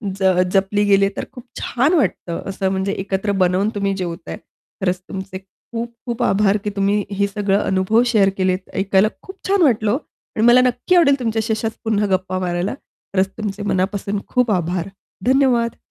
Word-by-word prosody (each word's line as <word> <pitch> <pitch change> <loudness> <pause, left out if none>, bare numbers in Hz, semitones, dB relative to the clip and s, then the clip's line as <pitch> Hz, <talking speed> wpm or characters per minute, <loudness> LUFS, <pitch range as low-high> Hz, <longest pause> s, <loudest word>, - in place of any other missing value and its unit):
ज 190 -2 +3
जपली 200 +1 +2
गेली 195 -1 +4
तर - - -2
खूप 250 -3 -11 0.2
छान 270 +8 +1
वाटतं 185 - 0
असं 190 0 -1
म्हणजे 190 +1 -1
एकत्र 200 +1 -1
बनवून 185 +3 +2
तुम्ही 200 -1 0
जेवताय. 170 -1 -5 0.4
खरंच 180 -1 0
तुमचे 190 -1 -6
खूप-खूप 235 +4 -7
आभार, 205 -1 +3
की 210 - -1
तुम्ही 200 +1 +1
हे 200 0 +1
सगळं 200 0 0
अनुभव 190 +4 +2
शेअर 215 -5 +4
केलेत. 185 0 -1
ऐकायला 195 +1 +3
खूप 380 +1 -11
छान 390 -1 +2
वाटलं. 220 -7 +3
ओ. 245 - +2 0.4
आणि 220 +1 +2
मला 245 +1 +7
नक्की 250 +8 +1
आवडेल 280 -5 +5
तुमच्याशी 225 -2 -1
अशाच 220 0 -2
पुन्हा 210 -2 +1
गप्पा 185 0 -3
मारायला. 175 +1 -1 0.4
खरंच 190 0 +2
तुमचे 205 -1 -4
मनापासून 200 +1 -1
खूप 250 -3 +1
आभार. 180 -1 -1 0.4
धन्यवाद. 250 -3 +3
200 Hz, 165 wpm, -20 LUFS, 190-235 Hz, 0.4 s, मला